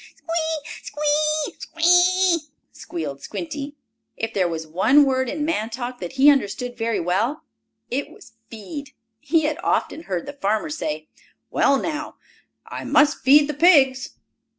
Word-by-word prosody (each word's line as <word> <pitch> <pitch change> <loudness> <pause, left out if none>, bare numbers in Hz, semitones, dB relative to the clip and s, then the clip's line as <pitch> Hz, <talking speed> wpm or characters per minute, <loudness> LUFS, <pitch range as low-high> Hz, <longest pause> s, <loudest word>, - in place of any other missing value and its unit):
"Squee! 320 -2 -3
Squee! 300 +1 0
Squee!" 355 +2 +3 0.3
squealed 145 -5 -6
Squinty. 275 - -6 0.4
If 225 +1 -3
there 185 -3 +1
was 160 -1 -4
one 215 - +4
word 260 -2 0
in 295 +2 -2
man 265 -9 -1
talk 245 +1 -6
that 175 -2 -6
he 275 +2 +6
understood 245 -1 -2
very 230 -1 -1
well, 205 - -1 0.5
it 270 +3 -2
was 410 - -16 0.2
"feed." 280 +6 -8 0.3
He 315 +6 +1
had 300 0 -1
often 320 - -1
heard 180 -3 -3
the 285 - -7
farmer 220 +3 -1
say: 155 - -4 0.4
"Well, 275 - +3
now 305 +2 -4 0.5
I - - -7
must 300 0 +3
feed 285 +2 +6
the 300 - -3
pigs." 270 -5 +4
280 Hz, 145 wpm, -22 LUFS, 220-305 Hz, 0.5 s, he